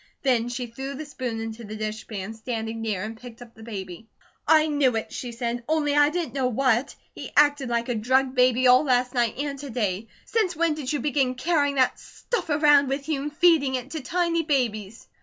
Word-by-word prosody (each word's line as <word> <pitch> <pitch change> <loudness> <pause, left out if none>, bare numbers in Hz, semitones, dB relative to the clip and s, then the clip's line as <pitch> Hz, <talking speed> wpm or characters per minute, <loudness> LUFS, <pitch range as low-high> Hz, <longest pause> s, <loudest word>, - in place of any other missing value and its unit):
Then 245 -3 +2
she 245 +1 -4
threw 265 +4 -6
the 310 +3 -6
spoon 250 -6 -5
into 225 +1 -6
the 215 0 -7
dishpan 215 -1 -5
standing 225 0 -5
near 210 -4 -2
and 220 +1 -7
picked 245 -2 -11
up 240 -1 -13
the 220 - -16
baby. 200 -2 -7 0.4
"I 310 -1 +6
knew 285 -5 +2
it!" 220 - -4
she 245 - -5
said. 235 0 -3
"Only 300 -2 +1
I 290 0 +5
didn't 325 -6 -3
know 265 -2 0
what. 255 +1 +1 0.2
He - - -8
acted 290 -3 +4
like 235 0 -1
a 245 - 0
drugged 260 +4 +1
baby 255 0 +3
all 255 +2 +6
last 250 -2 +1
night 240 -3 0
and 280 0 -3
to 285 0 -7
day. 215 -3 -2 0.2
Since 415 -6 0
when 330 0 +1
did 295 -4 -4
you 295 -4 -1
begin 265 -2 0
carrying 285 0 +1
that 260 -2 +2
stuff 480 -8 -5
around 295 -2 +4
with 275 +1 -3
you, 290 -3 0
and 295 +1 -6
feeding 315 -7 +4
it 255 +2 -5
to 315 - -4
tiny 335 +4 0
babies?" 230 -8 -2
255 Hz, 215 wpm, -25 LUFS, 230-290 Hz, 0.4 s, I